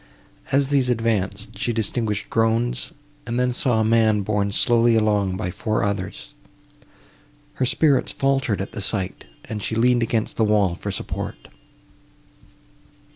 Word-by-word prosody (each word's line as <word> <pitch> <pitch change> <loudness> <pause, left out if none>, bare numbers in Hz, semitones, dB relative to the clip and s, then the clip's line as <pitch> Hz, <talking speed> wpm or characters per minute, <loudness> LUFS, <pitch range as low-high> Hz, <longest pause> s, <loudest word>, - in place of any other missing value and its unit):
As 140 0 +2
these 135 -3 +2
advanced, 105 -4 -1
she 120 - 0
distinguished 110 -2 -2
groans, 115 +2 +1 0.4
and 120 +1 -1
then 125 0 +1
saw 120 -2 +1
a - - +3
man 110 -2 +3
borne 100 0 0
slowly 115 +2 +3
along 105 -4 +1
by 90 -3 -3
four 110 +4 -1
others. 100 0 -4 1.3
Her 130 - +3
spirits 145 0 +2
faltered 135 -7 0
at 95 - -5
the 105 - -6
sight, 95 -2 -2 0.2
and 105 -2 -5
she 110 - -2
leaned 120 +1 +3
against 115 -1 -1
the 115 - +3
wall 105 -4 +3
for 95 +4 -6
support. 95 - -5
110 Hz, 140 wpm, -22 LUFS, 105-120 Hz, 1.3 s, a